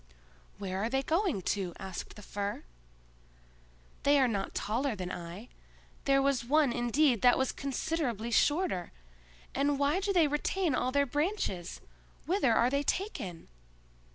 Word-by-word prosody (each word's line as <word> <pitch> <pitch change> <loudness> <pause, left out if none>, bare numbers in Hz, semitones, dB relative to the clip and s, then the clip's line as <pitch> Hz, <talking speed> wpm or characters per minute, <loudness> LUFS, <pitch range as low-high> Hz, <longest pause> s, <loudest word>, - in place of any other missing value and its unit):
"Where 190 -2 -4
are 225 - 0
they 270 +2 0
going 325 - 0
to?" 190 -4 -4
asked 190 -2 -7
the 210 - -11
Fir. 200 +1 -4 1.4
"They 285 +1 +4
are 265 -2 +4
not 200 -4 -2
taller 240 +3 -1
than 180 -2 -5
I; 175 +7 -7 0.6
there 275 0 +4
was 275 -4 +1
one 285 0 +3
indeed 240 +1 +2
that 245 -1 +6
was 265 -1 +1
considerably 265 -4 -2
shorter;—and 180 - -1
why 285 +5 +2
do 400 +1 0
they 345 -5 +4
retain 300 +3 0
all 255 0 0
their 280 +1 +3
branches? 290 - -2 0.4
Whither 350 - +2
are 235 +2 +3
they 280 0 +1
taken?" 245 - -3
255 Hz, 140 wpm, -31 LUFS, 200-290 Hz, 1.4 s, that